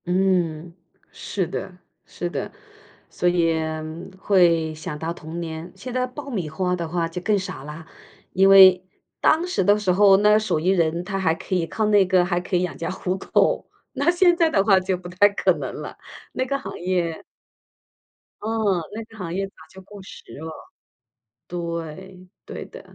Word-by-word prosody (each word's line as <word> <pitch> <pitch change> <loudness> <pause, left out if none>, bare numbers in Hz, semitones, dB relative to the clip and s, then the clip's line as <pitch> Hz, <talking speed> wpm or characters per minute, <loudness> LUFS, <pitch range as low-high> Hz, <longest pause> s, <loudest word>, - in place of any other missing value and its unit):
嗯， 175 -3 0 0.4
是 190 -3 -3
的， 180 +1 -6 0.3
是 175 - -5
的。 - - -4 0.6
所 180 - -1
以 170 -2 +2 0.6
会 170 -5 +3
想 155 -1 -6
到 160 +2 -3
童 165 0 -8
年， 165 +1 -6
现 255 -1 -8
在 255 0 0
爆 280 +3 -9
米 190 - -3
花 180 +3 -1
的 170 -2 -4
话 170 0 -1
就 165 +2 -6
更 210 +2 +2
少 185 -8 -6
啦， 150 +2 -9 0.5
因 195 +1 +5
为 190 -2 +8 0.4
当 325 +3 +3
时 360 - 0
的 205 +3 +4
时 205 -3 0
候， 195 +1 +6
那 210 +1 +5
手 215 -7 -1
艺 170 +4 0
人 170 -2 +1
他 195 +2 -3
还 165 -4 +1
可 170 - -7
以 175 -3 +1
靠 215 +6 -1
那 205 -2 +5
个 180 -1 +3
还 175 -1 0
可 180 +1 -3
以 180 - +2
养 180 - -3
家 165 - -4
糊 185 0 -2
口， - - +1 0.2
那 - - +1
现 350 0 +4
在 335 -2 +3
的 195 -9 +2
话 195 -2 +5
就 185 0 -1
不 175 0 -10
太 185 +3 +4
可 200 - +1
能 - - -4
了， - - -8 0.4
那 - - -1
个 275 - 0
行 275 - -8
业 175 -2 -2 1.2
嗯， 215 -5 0
那 220 +2 -6
个 225 0 -17
行 175 -3 -5
业 195 +2 -1
早 195 - -22 0.2
就 190 - -13
过 200 +1 -12
时 190 - -12 0.2
了。 160 +1 -6 1.0
对， 170 +2 -6 0.2
对 - - -7
的。 - - -12
185 Hz, 200 characters per minute, -23 LUFS, 170-200 Hz, 1.2 s, 为